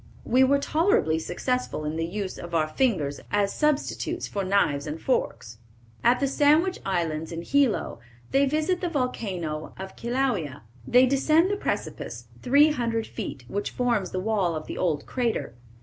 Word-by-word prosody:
We 255 Hz, +2 st, +4 dB
were 275 Hz, +2 st, +4 dB
tolerably 280 Hz, -, +2 dB
successful 250 Hz, -2 st, -2 dB
in 150 Hz, +1 st, -2 dB
the 165 Hz, 0 st, -1 dB
use 195 Hz, +1 st, -4 dB
of 175 Hz, 0 st, -6 dB
our 155 Hz, -1 st, +2 dB
fingers 155 Hz, -, 0 dB
as 205 Hz, 0 st, +1 dB
substitutes 300 Hz, -1 st, -1 dB
for 200 Hz, -, -3 dB
knives 185 Hz, -7 st, +1 dB
and 150 Hz, +2 st, -4 dB
forks." 115 Hz, -, -2 dB, 0.4 s
At 245 Hz, +2 st, +4 dB
the 275 Hz, -, +1 dB
Sandwich 305 Hz, +7 st, +3 dB
Islands, 165 Hz, -4 st, -2 dB
in 165 Hz, 0 st, -5 dB
Hilo, 275 Hz, -, +1 dB, 0.3 s
they 275 Hz, +1 st, +4 dB
visit 310 Hz, +6 st, 0 dB
the 355 Hz, -, -1 dB
volcano 190 Hz, -, -3 dB
of 190 Hz, 0 st, -8 dB
Kilauea. 235 Hz, -, -1 dB, 0.2 s
They 250 Hz, +1 st, +6 dB
descend 310 Hz, +7 st, +3 dB
the -, -, +1 dB
precipice, 405 Hz, -, -4 dB
three 285 Hz, +4 st, +5 dB
hundred 230 Hz, -5 st, -1 dB
feet, 135 Hz, -3 st, -6 dB
which 205 Hz, +1 st, -2 dB
forms 235 Hz, -7 st, 0 dB
the 185 Hz, -, -3 dB
wall 190 Hz, -4 st, 0 dB
of 155 Hz, -, -5 dB
the -, -, -6 dB
old 155 Hz, -5 st, -1 dB
crater. 235 Hz, -, -2 dB
220 Hz, 165 wpm, -26 LUFS, 165-270 Hz, 0.4 s, They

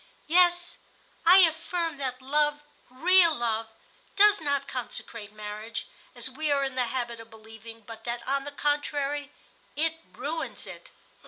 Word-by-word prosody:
"Yes, 350 Hz, +1 st, +3 dB, 0.5 s
I 370 Hz, +2 st, +10 dB
affirm 330 Hz, 0 st, -3 dB
that 260 Hz, -2 st, -4 dB
love, 295 Hz, +2 st, +1 dB, 0.3 s
real 335 Hz, +5 st, +5 dB
love, 225 Hz, -2 st, -1 dB, 0.5 s
does 410 Hz, -2 st, +6 dB
not 285 Hz, -2 st, -1 dB
consecrate 230 Hz, -4 st, -6 dB
marriage, 215 Hz, +2 st, -6 dB, 0.3 s
as 240 Hz, 0 st, -2 dB
we 300 Hz, +4 st, -3 dB
are 280 Hz, -1 st, +2 dB
in 270 Hz, -1 st, -2 dB
the 255 Hz, -1 st, 0 dB
habit 235 Hz, -1 st, -3 dB
of 225 Hz, 0 st, -12 dB
believing, 225 Hz, +1 st, -12 dB
but 225 Hz, +1 st, -11 dB
that, 235 Hz, 0 st, -4 dB
on 275 Hz, +1 st, 0 dB
the 290 Hz, -, -7 dB
contrary, 290 Hz, 0 st, -1 dB, 0.4 s
it 325 Hz, +2 st, 0 dB
ruins 315 Hz, +4 st, -5 dB
it." -, -, -11 dB
275 Hz, 145 wpm, -27 LUFS, 235-315 Hz, 0.5 s, I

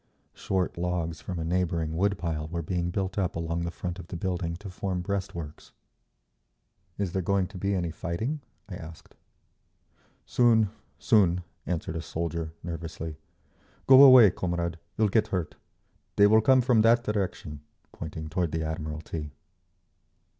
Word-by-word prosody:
Short 95 Hz, -2 st, -2 dB
logs 85 Hz, -3 st, -2 dB
from 90 Hz, +2 st, -5 dB
a 80 Hz, -, -2 dB
neighbouring 85 Hz, -2 st, -1 dB
wood 100 Hz, +3 st, +1 dB
pile 80 Hz, -4 st, -3 dB
were 85 Hz, +1 st, -4 dB
being 85 Hz, +1 st, -1 dB
built 95 Hz, +3 st, -2 dB
up 90 Hz, -3 st, -1 dB
along 85 Hz, 0 st, -2 dB
the 85 Hz, -, -2 dB
front 90 Hz, +1 st, -5 dB
of 85 Hz, -, -9 dB
the -, -, -7 dB
building 90 Hz, -2 st, -2 dB
to 100 Hz, +3 st, -9 dB
form 90 Hz, -1 st, -3 dB
breastworks…. 90 Hz, -6 st, -5 dB, 1.2 s
"Is 100 Hz, -3 st, -2 dB
there 95 Hz, -, 0 dB
going 100 Hz, +1 st, +1 dB
to 100 Hz, -, -10 dB
be 100 Hz, +2 st, 0 dB
any 85 Hz, -3 st, -1 dB
fighting?" 110 Hz, -, -3 dB, 0.3 s
I 100 Hz, -, -8 dB
asked. 80 Hz, -3 st, -11 dB, 1.1 s
"Soon, 115 Hz, -4 st, +3 dB, 0.3 s
soon," 90 Hz, -7 st, +3 dB, 0.2 s
answered 85 Hz, -2 st, -3 dB
a -, -, -3 dB
soldier, 85 Hz, -1 st, -3 dB
nervously. 80 Hz, -2 st, -6 dB, 0.7 s
"Go 130 Hz, 0 st, +9 dB
away, 130 Hz, -7 st, +9 dB
comrade, 85 Hz, -2 st, -3 dB, 0.2 s
you'll 110 Hz, -, +3 dB
get 110 Hz, +2 st, +2 dB
hurt. 90 Hz, -6 st, -2 dB, 0.6 s
They 100 Hz, -, +6 dB
will 110 Hz, +2 st, +6 dB
come 130 Hz, +3 st, +5 dB
from 120 Hz, -2 st, +3 dB
that 115 Hz, +2 st, +4 dB
direction," 100 Hz, -7 st, -3 dB, 0.3 s
pointing 80 Hz, 0 st, -7 dB
toward 85 Hz, +1 st, -1 dB
the 80 Hz, 0 st, -1 dB
Admiralty. 80 Hz, 0 st, -5 dB
90 Hz, 150 wpm, -27 LUFS, 80-100 Hz, 1.2 s, Go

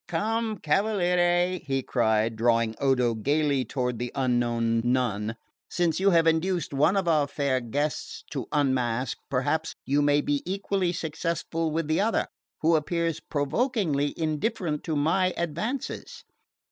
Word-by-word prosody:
"Come 220 Hz, +5 st, -1 dB
cavaliere," 180 Hz, 0 st, +2 dB
he 135 Hz, -2 st, -2 dB
cried, 110 Hz, -2 st, +1 dB
drawing 115 Hz, 0 st, +2 dB
Odo 125 Hz, -4 st, +2 dB
gaily 140 Hz, +4 st, +1 dB
toward 125 Hz, -3 st, -2 dB
the 120 Hz, 0 st, -3 dB
unknown 120 Hz, -3 st, +1 dB
nun, 120 Hz, -3 st, 0 dB, 0.3 s
"since 170 Hz, -2 st, 0 dB
you 195 Hz, +1 st, +4 dB
have 165 Hz, -3 st, +4 dB
induced 165 Hz, 0 st, +1 dB
one 150 Hz, +8 st, +3 dB
of 190 Hz, -3 st, 0 dB
our 155 Hz, -3 st, +3 dB
fair 140 Hz, -2 st, 0 dB
guests 145 Hz, +6 st, -3 dB
to -, -, -4 dB
unmask 130 Hz, -3 st, 0 dB
perhaps 145 Hz, +4 st, -1 dB
you 140 Hz, +2 st, +2 dB
may 145 Hz, 0 st, +3 dB
be 145 Hz, -1 st, 0 dB
equally 195 Hz, -1 st, -1 dB
successful 165 Hz, 0 st, -2 dB
with 160 Hz, 0 st, -2 dB
the 155 Hz, +4 st, +2 dB
other, 220 Hz, +2 st, +1 dB, 0.4 s
who 165 Hz, +1 st, +4 dB
appears 165 Hz, +1 st, 0 dB
provokingly 150 Hz, -, 0 dB
indifferent 155 Hz, 0 st, -1 dB
to 160 Hz, -, -1 dB
my 175 Hz, +5 st, +2 dB
advances." 170 Hz, -, -4 dB
150 Hz, 135 wpm, -26 LUFS, 130-175 Hz, 0.4 s, you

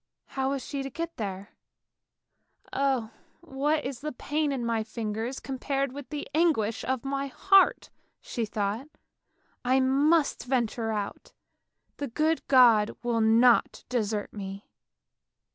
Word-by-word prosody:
How 265 Hz, 0 st, -1 dB
was 275 Hz, -2 st, -3 dB
she 280 Hz, -2 st, -4 dB
to 270 Hz, -, -4 dB
get 335 Hz, +5 st, -5 dB
there? 200 Hz, -2 st, -5 dB, 0.6 s
" -, -, -60 dB, 0.5 s
Oh, 265 Hz, -5 st, 0 dB, 0.3 s
what 300 Hz, -1 st, -1 dB
is 260 Hz, -2 st, -4 dB
the 300 Hz, +3 st, -4 dB
pain 295 Hz, +3 st, -1 dB
of 270 Hz, -, -2 dB
my 230 Hz, -1 st, 0 dB
fingers 225 Hz, +3 st, -4 dB
compared 275 Hz, 0 st, -2 dB
with 280 Hz, 0 st, -9 dB
the 300 Hz, -2 st, -5 dB
anguish 295 Hz, -10 st, +2 dB
of 260 Hz, 0 st, -2 dB
my 275 Hz, 0 st, -2 dB
heart," 390 Hz, +8 st, +3 dB, 0.3 s
she 235 Hz, -, -4 dB
thought. 215 Hz, +5 st, -2 dB, 0.4 s
" -, -, -47 dB, 0.3 s
I 255 Hz, +2 st, +3 dB
must 285 Hz, +4 st, +2 dB
venture 235 Hz, -3 st, 0 dB
out, 205 Hz, -2 st, -5 dB, 0.6 s
the 285 Hz, -, -3 dB
good 310 Hz, +6 st, +1 dB
God 235 Hz, -5 st, +5 dB
will 235 Hz, -1 st, +1 dB
not 230 Hz, +2 st, +4 dB
desert 215 Hz, -4 st, -2 dB
me! 195 Hz, -1 st, -8 dB
260 Hz, 140 wpm, -28 LUFS, 225-280 Hz, 0.6 s, God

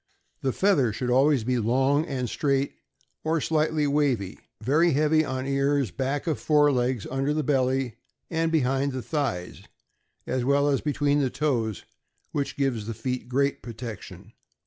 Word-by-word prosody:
The 135 Hz, -, 0 dB
feather 145 Hz, -, +2 dB
should 125 Hz, +4 st, -2 dB
always 135 Hz, 0 st, +4 dB
be 125 Hz, +1 st, 0 dB
long 135 Hz, +7 st, +2 dB
and 130 Hz, -3 st, -2 dB
straight, 140 Hz, +3 st, 0 dB, 0.5 s
or 160 Hz, +1 st, +1 dB
slightly 155 Hz, 0 st, +1 dB
wavy, 140 Hz, -9 st, 0 dB, 0.2 s
very 150 Hz, +9 st, +3 dB
heavy 155 Hz, +2 st, +3 dB
on 130 Hz, -2 st, -3 dB
ears, 140 Hz, -3 st, +1 dB
back 135 Hz, -, -2 dB
of 160 Hz, -3 st, -1 dB
fore 150 Hz, -1 st, +4 dB
legs, 125 Hz, -3 st, 0 dB
under 135 Hz, +3 st, 0 dB
the 155 Hz, -, 0 dB
belly, 130 Hz, -3 st, 0 dB, 0.3 s
and 165 Hz, 0 st, 0 dB
behind 135 Hz, -2 st, +1 dB
the 130 Hz, -2 st, -4 dB
thighs, 125 Hz, -, -3 dB, 0.6 s
as 130 Hz, -1 st, -1 dB
well 140 Hz, +2 st, +3 dB
as 140 Hz, -, +1 dB
between 145 Hz, -1 st, +1 dB
the 135 Hz, -3 st, +1 dB
toes, 120 Hz, -8 st, -1 dB, 0.5 s
which 140 Hz, -2 st, -3 dB
gives 125 Hz, -7 st, -1 dB
the 115 Hz, -, -4 dB
feet 125 Hz, 0 st, -4 dB
great 140 Hz, +2 st, +1 dB
protection. 110 Hz, -4 st, -9 dB
135 Hz, 155 wpm, -26 LUFS, 125-145 Hz, 0.6 s, always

